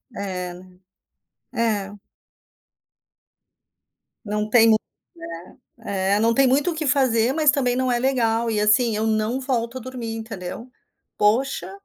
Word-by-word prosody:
É. 180 -3 -4 1.0
É. 210 -4 -1 2.3
Não 210 0 -2
tem 230 0 +6
mu 220 - +6 1.0
né. 195 -3 -1
Eh, - - +1
não 230 +1 +3
tem 275 +2 +4
muito 280 +6 +2
o - - -6
que 315 -1 -3
fazer, 250 -3 +2
mas 305 0 +4
também 250 -4 0
não 260 0 0
é 240 - +1
legal, 235 -3 +1
e 215 -2 0
assim, 215 +2 +3
eu 220 +1 -1
não 220 +3 0
volto 250 -2 -2
a - - -10
dormir, 245 -2 -6
entendeu. 220 0 -7 0.5
Poxa, 235 +7 +1
230 Hz, 135 wpm, -22 LUFS, 210-255 Hz, 2.3 s, tem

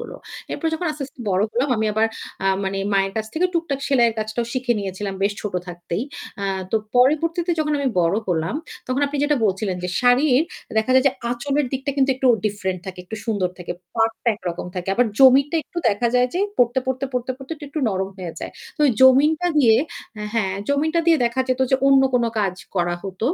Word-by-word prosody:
হল। - - -7 0.4
এরপর 330 - -3
যখন 345 +2 -3
আস্তে, 295 -1 -6
আস্তে 270 -1 -16
বড় 185 +1 +2
হলাম 255 +5 0
আমি 220 0 0
আবার 220 +1 +3 0.4
আ - - +2 0.2
মানে 195 0 -2
মায়ের 195 0 +2
কাছ 220 0 -1
থেকে 345 +3 +2
টুকটাক 330 -5 -1
সেলাইয়ের 240 -5 +3
কাজটাও 220 +2 -2
শিখে 255 -1 0
নিয়েছিলাম 195 0 -4
বেশ 200 +1 +2
ছোট 205 -3 -4
থাকতেই। 175 +3 -4 0.4
আ - - -1 0.3
তো - - +2 0.2
পরবর্তীতে 325 +7 +3
যখন 300 -1 0
আমি 280 - +1
বড় 170 +3 +2
হলাম, 165 +2 0 0.3
তখন 255 +2 -1
আপনি 290 - -4
যেটা 295 0 +2
বলছিলেন, 195 -1 0
যে - - -2
শাড়ির 250 +3 +4 0.4
দেখা 220 +3 0
যায় 260 +1 +5
যে - - -4 0.2
আঁচলের 275 +4 0
দিকটা 270 +1 -2
কিন্তু 270 -1 +3
একটু 265 - 0 0.2
ডিফারেন্ট 190 -3 -3
থাকে, 185 -1 -7
একটু 220 +4 -7
সুন্দর 200 -5 0
থাকে। 175 -1 -5 0.2
পাড়টা 225 +1 0
একরকম 175 -4 -5
থাকে। 180 0 -5
আবার 245 +3 +3
জমিনটা 275 +4 +6
একটু 350 - -6
দেখা 215 +3 +1
যায় 250 0 +4
যে 365 - +1 0.2
পড়তে, 245 +1 +3
পড়তে, 260 +1 -1
পড়তে, 250 0 -2
পড়তে 270 +3 -7 0.2
একটু 300 - -4
নরম 190 -1 -1
হয়ে 175 -3 -5
যায়। - - -5 0.3
তো - - +2 0.2
জমিনটা 295 +6 +5
দিয়ে 235 -6 +6 0.4
অ্যা 210 - -5
হ্যাঁ 195 -4 0
জমিনটা 310 +4 +1
দিয়ে 330 - +6
দেখা 235 +2 0
যেত 255 0 0
যে 265 - +5
অন্য 275 -1 +6
কোন 240 -1 +3 0.2
কাজ 195 -3 0 0.2
করা 175 -2 +1
হত। 190 -2 -8
245 Hz, 205 wpm, -22 LUFS, 195-275 Hz, 0.4 s, জমিনটা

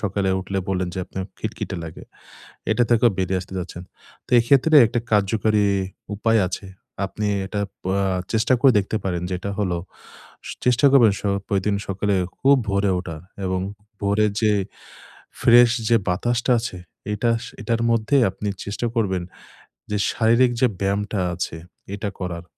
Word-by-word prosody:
সকালে 100 -1 -1
উঠলে 95 +1 -3
বললেন 95 -2 -1
যে - - -4
আপনার 95 -1 -5
খিটখিটে 105 -2 -4
লাগে। 80 - -9 0.7
এটা 120 - +2
থেকেও 120 0 +5
বেরিয়ে 95 0 0
আসতে 95 - -11
যাচ্ছেন। 90 0 -6 0.4
তো - - -20
এক্ষেত্রে 140 +6 +4
একটা 120 +1 -1
কার্যকরী 105 +1 +2 0.5
উপায় 115 +1 +2
আছে। 95 +1 -6 0.4
আপনি 105 +2 -4 0.2
এটা 100 +1 -3 0.2
পয়া 95 +1 0 0.3
চেষ্টা 115 +3 +3
করে 135 -2 +6
দেখতে 100 +2 -1
পারেন। 90 -2 -2
যেটা 95 +2 -3
হলো, 90 -4 0 0.7
সু - - -5
চেষ্টা 125 +3 +4
করবেন 115 -7 +6
সো 100 - -1 0.2
প্রতিদিন 100 +1 0
সকালে 100 +1 0 0.2
খুব 140 +1 +5
ভোরে 100 0 +1
ওঠা 85 -3 -6 0.3
এবং 95 0 -1 0.4
ভোরের 105 +1 +2
যে 110 - +4 0.9
ফ্রেশ 120 0 +7 0.2
যে 115 - +5
বাতাসটা 120 +7 +1
আছে। 115 -5 -5 0.4
এতাশ 115 +2 0 0.2
এটার 115 -1 0
মধ্যে 115 +4 +2
আপনি 105 +2 -5 0.2
চেষ্টা 100 +4 -3
করবেন 95 -5 0 0.7
যে 105 - +1
শারীরিক 120 +2 +3
যে 130 - +6
ব্যায়ামটা 100 +1 -1
আছে 85 -2 -4 0.4
এটা 100 0 -3
করার। 90 -2 -4
105 Hz, 150 wpm, -22 LUFS, 95-115 Hz, 0.9 s, ফ্রেশ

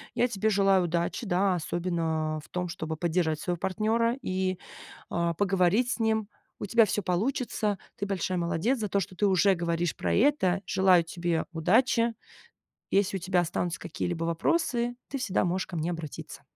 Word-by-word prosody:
Я 245 - +3
тебе 220 -2 0
желаю 195 -2 +3
удачи, 170 +7 -1
да? 190 0 +2
Особенно, 165 -2 -1
в - - -17
том, 180 0 -3
чтобы 160 -2 -5
поддержать 160 -2 0
своего 175 +2 -2
партнера 220 +6 0
и, 185 0 -1 0.5
а, 170 0 0
поговорить 195 +5 +2
с 235 - -2
ним. 220 -1 +1 0.3
У - - -3
тебя 230 +2 +5
всё 205 +1 -1
получится. 210 +2 -1 0.2
Ты 200 - -2
большая 185 -2 -2
молодец 175 +9 0
за 210 -2 -2
то, 200 - +1
что 185 0 -5
ты 205 - +1
уже 190 +1 +4
говоришь 170 0 -1
про - - -1
это. 195 -7 +3
Желаю 185 -2 +4
тебе 170 -1 -2
удачи. 230 +7 +3 0.8
Если 195 0 +2
у - - -13
тебя 180 0 +1
останутся 170 -1 -2
какие-либо 170 -1 -3
вопросы, 240 - 0
ты 275 - -4
всегда 220 -9 0
можешь 185 +1 -1
ко 175 - -6
мне 160 +2 -1
обратиться. 165 -4 -7
185 Hz, 170 wpm, -28 LUFS, 170-215 Hz, 0.8 s, тебя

